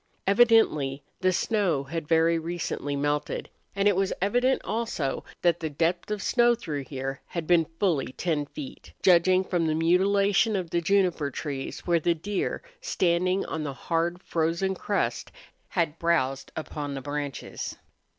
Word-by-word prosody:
Evidently 195 Hz, -, +4 dB, 0.2 s
the 185 Hz, 0 st, +3 dB
snow 185 Hz, -7 st, +1 dB
had 155 Hz, +2 st, -5 dB
very 165 Hz, +1 st, +3 dB
recently 160 Hz, -3 st, -3 dB
melted, 145 Hz, +1 st, -2 dB, 0.2 s
and 200 Hz, +1 st, +2 dB
it 205 Hz, -, +4 dB
was 195 Hz, +1 st, +1 dB
evident 245 Hz, +7 st, +2 dB
also 215 Hz, -12 st, -2 dB, 0.2 s
that 175 Hz, -1 st, +3 dB
the 160 Hz, -, -3 dB
depth 170 Hz, +5 st, -1 dB
of 210 Hz, -1 st, -2 dB
snow 240 Hz, -1 st, +4 dB
through 150 Hz, -, -4 dB
here 135 Hz, 0 st, -5 dB
had 170 Hz, -2 st, -4 dB
been 165 Hz, -1 st, +4 dB
fully 165 Hz, -11 st, +1 dB
ten 150 Hz, -3 st, -1 dB
feet, 270 Hz, -, -9 dB
judging 185 Hz, +1 st, +5 dB
from 175 Hz, -3 st, 0 dB
the 155 Hz, -, +1 dB
mutilation 195 Hz, +6 st, +3 dB
of 180 Hz, -4 st, -3 dB
the 170 Hz, -, +1 dB
juniper 180 Hz, -5 st, +2 dB
trees 140 Hz, -3 st, -5 dB
where 170 Hz, -1 st, +2 dB
the 170 Hz, +2 st, +1 dB
deer, 195 Hz, +5 st, -3 dB, 0.2 s
standing 185 Hz, -, +1 dB
on 160 Hz, -, -4 dB
the 145 Hz, -2 st, -3 dB
hard, 170 Hz, +5 st, -1 dB
frozen 170 Hz, +4 st, 0 dB
crust, 200 Hz, +2 st, -2 dB, 0.4 s
had 165 Hz, -3 st, -1 dB
browsed 135 Hz, -6 st, 0 dB
upon 145 Hz, -2 st, -4 dB
the 135 Hz, -, -4 dB
branches. 145 Hz, 0 st, -5 dB
170 Hz, 150 wpm, -27 LUFS, 150-195 Hz, 0.4 s, judging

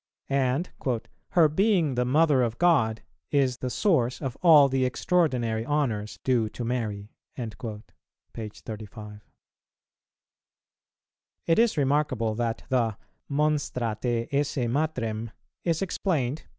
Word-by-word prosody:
And 135 Hz, +4 st, 0 dB, 0.6 s
"Her 170 Hz, -4 st, +6 dB
being 175 Hz, -2 st, +2 dB
the 125 Hz, 0 st, 0 dB
Mother 145 Hz, +1 st, +4 dB
of 115 Hz, -2 st, -1 dB
God 125 Hz, -11 st, +2 dB, 0.3 s
is 135 Hz, -4 st, +2 dB
the 130 Hz, -, -3 dB
source 130 Hz, -, +1 dB
of 135 Hz, -4 st, -4 dB
all 155 Hz, -5 st, +8 dB
the 135 Hz, -1 st, 0 dB
extraordinary 125 Hz, -5 st, +1 dB
honours 120 Hz, -7 st, -1 dB
due 120 Hz, -4 st, +2 dB
to 120 Hz, -, -6 dB
Mary," 110 Hz, -4 st, -3 dB, 0.2 s
p. 110 Hz, -1 st, -8 dB
35. 105 Hz, -1 st, -9 dB, 2.2 s
It 165 Hz, +3 st, +3 dB
is 230 Hz, -6 st, +3 dB
remarkable 135 Hz, -6 st, +1 dB
that 115 Hz, 0 st, -2 dB
the 115 Hz, -5 st, +1 dB, 0.3 s
"Monstra 140 Hz, -7 st, 0 dB
te 120 Hz, -2 st, -1 dB
esse 145 Hz, +1 st, 0 dB
Matrem" 115 Hz, -5 st, -1 dB, 0.3 s
is 170 Hz, +1 st, 0 dB
explained, 155 Hz, -8 st, -1 dB
p. -, -, -17 dB
125 Hz, 115 wpm, -26 LUFS, 115-150 Hz, 2.2 s, all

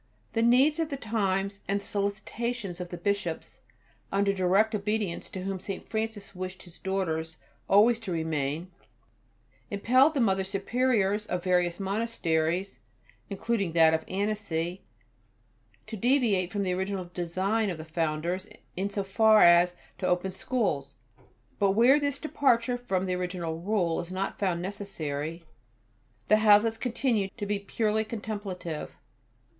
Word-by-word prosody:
The 225 Hz, -, +1 dB
needs 260 Hz, +7 st, +4 dB
of 325 Hz, -2 st, 0 dB
the 280 Hz, -, -3 dB
times, 200 Hz, -4 st, -1 dB
and 200 Hz, +1 st, +1 dB
the 200 Hz, -, -14 dB
solicitations 205 Hz, -1 st, -3 dB
of 175 Hz, -, -6 dB
the 175 Hz, -, -6 dB
Bishops, 185 Hz, -2 st, -2 dB, 0.5 s
under 200 Hz, 0 st, +2 dB
direct 195 Hz, +4 st, +2 dB
obedience 210 Hz, -3 st, -2 dB
to 185 Hz, -, -6 dB
whom 195 Hz, 0 st, -3 dB
St. 195 Hz, +1 st, -6 dB
Francis 220 Hz, -2 st, -4 dB
wished 185 Hz, 0 st, -6 dB
his 175 Hz, -2 st, -14 dB
daughters 160 Hz, -4 st, -2 dB, 0.3 s
always 220 Hz, +4 st, +5 dB
to 210 Hz, -5 st, -6 dB
remain, 160 Hz, +1 st, -2 dB, 1.0 s
impelled 255 Hz, +9 st, +4 dB
the -, -, +1 dB
Mother 195 Hz, -5 st, +2 dB
Superiors 210 Hz, +1 st, 0 dB
of 180 Hz, -1 st, -2 dB
various 180 Hz, -1 st, +1 dB
monasteries, 195 Hz, -4 st, -1 dB, 0.5 s
including 200 Hz, -3 st, -1 dB
that 160 Hz, -1 st, +6 dB
of 160 Hz, 0 st, 0 dB
Annecy, 190 Hz, -4 st, -2 dB, 1.0 s
to 225 Hz, -, -6 dB
deviate 220 Hz, -5 st, +2 dB
from 205 Hz, -2 st, -1 dB
the 185 Hz, -1 st, 0 dB
original 190 Hz, 0 st, -2 dB
design 190 Hz, +5 st, 0 dB
of 175 Hz, -, -3 dB
the 155 Hz, -, -8 dB
founders 165 Hz, +4 st, -2 dB, 0.3 s
in 195 Hz, +2 st, -1 dB
so 200 Hz, 0 st, -2 dB
far 215 Hz, +2 st, +5 dB
as 175 Hz, +1 st, +6 dB, 0.2 s
to 185 Hz, -, -1 dB
open 180 Hz, +2 st, +1 dB
schools. 155 Hz, -, -2 dB, 0.6 s
But 195 Hz, -1 st, +3 dB
where 245 Hz, +7 st, +6 dB
this 285 Hz, -1 st, -1 dB
departure 255 Hz, -5 st, +1 dB
from 190 Hz, -6 st, -1 dB
the 185 Hz, -, -1 dB
original 180 Hz, -3 st, -3 dB
Rule 175 Hz, -3 st, 0 dB
is 175 Hz, +1 st, -6 dB
not 190 Hz, +1 st, -3 dB
found 175 Hz, -4 st, 0 dB
necessary, 165 Hz, -5 st, -5 dB, 0.8 s
the 215 Hz, -, +6 dB
houses 215 Hz, +1 st, +5 dB
continue 235 Hz, -5 st, 0 dB
to 205 Hz, -, -3 dB
be 205 Hz, 0 st, -1 dB
purely 215 Hz, +2 st, 0 dB
contemplative. 205 Hz, -7 st, -5 dB
195 Hz, 140 wpm, -28 LUFS, 180-220 Hz, 1.0 s, that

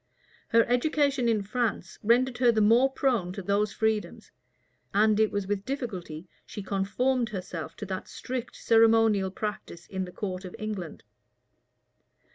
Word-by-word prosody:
Her 230 Hz, 0 st, +5 dB
education 275 Hz, 0 st, +1 dB
in 215 Hz, -3 st, +1 dB
France 210 Hz, -4 st, -2 dB
rendered 245 Hz, +3 st, +2 dB
her 245 Hz, -2 st, +5 dB
the 220 Hz, -, +1 dB
more 230 Hz, +5 st, +5 dB
prone 240 Hz, -10 st, 0 dB
to 195 Hz, -, -6 dB
those 200 Hz, +2 st, +1 dB
freedoms; 220 Hz, +1 st, -2 dB, 0.6 s
and 215 Hz, +1 st, +4 dB
it 220 Hz, -1 st, +3 dB
was 205 Hz, -1 st, -2 dB
with 200 Hz, 0 st, -2 dB
difficulty 190 Hz, -, -5 dB, 0.2 s
she 205 Hz, -, -8 dB
conformed 230 Hz, +6 st, 0 dB
herself 170 Hz, -5 st, -6 dB
to 210 Hz, -, -6 dB
that 190 Hz, -1 st, -5 dB
strict 250 Hz, -1 st, -5 dB
ceremonial 225 Hz, -3 st, +4 dB
practised 195 Hz, -3 st, -6 dB
in 190 Hz, -1 st, -2 dB
the 180 Hz, -, -10 dB
court 185 Hz, -1 st, -5 dB
of 185 Hz, -, -8 dB
England. 205 Hz, -6 st, -5 dB
215 Hz, 145 wpm, -28 LUFS, 190-240 Hz, 0.6 s, Her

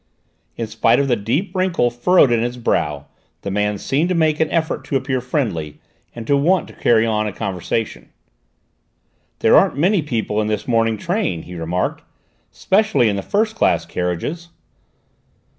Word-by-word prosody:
In 115 Hz, -, -3 dB
spite 115 Hz, +2 st, +2 dB
of 140 Hz, -, +1 dB
the 125 Hz, -, +2 dB
deep 135 Hz, -, -2 dB
wrinkle 185 Hz, -10 st, +1 dB
furrowed 135 Hz, +3 st, +4 dB
in 115 Hz, -1 st, +2 dB
his 120 Hz, +1 st, -2 dB
brow 75 Hz, -11 st, -1 dB, 0.4 s
the 100 Hz, -, -3 dB
man 105 Hz, +1 st, 0 dB
seemed 140 Hz, -, 0 dB
to 185 Hz, -, +1 dB
make 155 Hz, -2 st, +2 dB
an 160 Hz, -1 st, +1 dB
effort 160 Hz, -1 st, -1 dB
to 140 Hz, -, -3 dB
appear 130 Hz, -1 st, -1 dB
friendly 105 Hz, -, -3 dB, 0.4 s
and 115 Hz, -1 st, -7 dB
to 140 Hz, -, +2 dB
want 170 Hz, +6 st, +2 dB
to -, -, -13 dB
carry 115 Hz, -1 st, +3 dB
on 110 Hz, -1 st, 0 dB
the -, -, -3 dB
conversation. 100 Hz, +2 st, -4 dB, 1.3 s
"There -, -, +5 dB
aren't -, -, +4 dB
many 180 Hz, +5 st, +3 dB
people 110 Hz, -7 st, -2 dB
in 105 Hz, -, -2 dB
this 105 Hz, +3 st, -2 dB
morning 115 Hz, -2 st, +1 dB
train," 175 Hz, -, -2 dB
he 90 Hz, -, -10 dB
remarked, 85 Hz, +2 st, -2 dB, 0.5 s
"specially 205 Hz, -, +2 dB
in 100 Hz, -, -1 dB
the 100 Hz, -, -2 dB
first 215 Hz, -, 0 dB
class 85 Hz, -, +1 dB
carriages." 90 Hz, -, -3 dB
120 Hz, 170 wpm, -19 LUFS, 105-160 Hz, 1.3 s, There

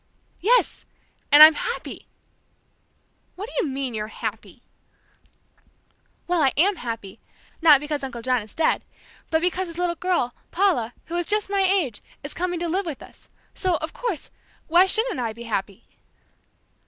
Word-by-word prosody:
"Yes, 480 Hz, +7 st, +2 dB, 0.4 s
and 295 Hz, +1 st, +11 dB
I'm 315 Hz, +1 st, +10 dB
happy!" -, -, -5 dB, 1.3 s
"What 400 Hz, +4 st, -6 dB
do -, -, -12 dB
you 290 Hz, -, -3 dB
mean, 265 Hz, -2 st, -3 dB
you're 215 Hz, -1 st, -3 dB
happy!" -, -, -7 dB, 1.6 s
"Well, 350 Hz, -2 st, +1 dB
I 270 Hz, -3 st, +4 dB
am 375 Hz, +5 st, +4 dB
happy! 225 Hz, -, -6 dB, 0.4 s
not 305 Hz, -4 st, +7 dB
because 295 Hz, 0 st, -4 dB
Uncle 240 Hz, -3 st, -6 dB
John 250 Hz, -1 st, +1 dB
is 210 Hz, 0 st, -12 dB
dead, 320 Hz, -, +1 dB, 0.5 s
but 320 Hz, 0 st, +1 dB
because 360 Hz, +1 st, -1 dB
his 335 Hz, 0 st, -9 dB
little 355 Hz, -1 st, 0 dB
girl, 345 Hz, -8 st, -1 dB, 0.2 s
Paula, 335 Hz, -, +1 dB
who 335 Hz, -, -6 dB
is 350 Hz, -, -2 dB
just 420 Hz, -1 st, 0 dB
my 400 Hz, -1 st, +2 dB
age, 370 Hz, -, +1 dB, 0.2 s
is 285 Hz, -, -6 dB
coming 355 Hz, -1 st, -2 dB
to 345 Hz, -, -1 dB
live 365 Hz, +3 st, -1 dB
with 300 Hz, -5 st, -6 dB
us, -, -, -18 dB, 0.2 s
so, 370 Hz, -2 st, 0 dB
of 315 Hz, +2 st, -6 dB
course, 450 Hz, -, -4 dB, 0.3 s
why 350 Hz, +3 st, +5 dB
shouldn't 445 Hz, -, 0 dB
I 230 Hz, -3 st, -2 dB
be 235 Hz, +1 st, -10 dB
happy?" 205 Hz, -2 st, -4 dB
320 Hz, 160 wpm, -23 LUFS, 250-365 Hz, 1.6 s, and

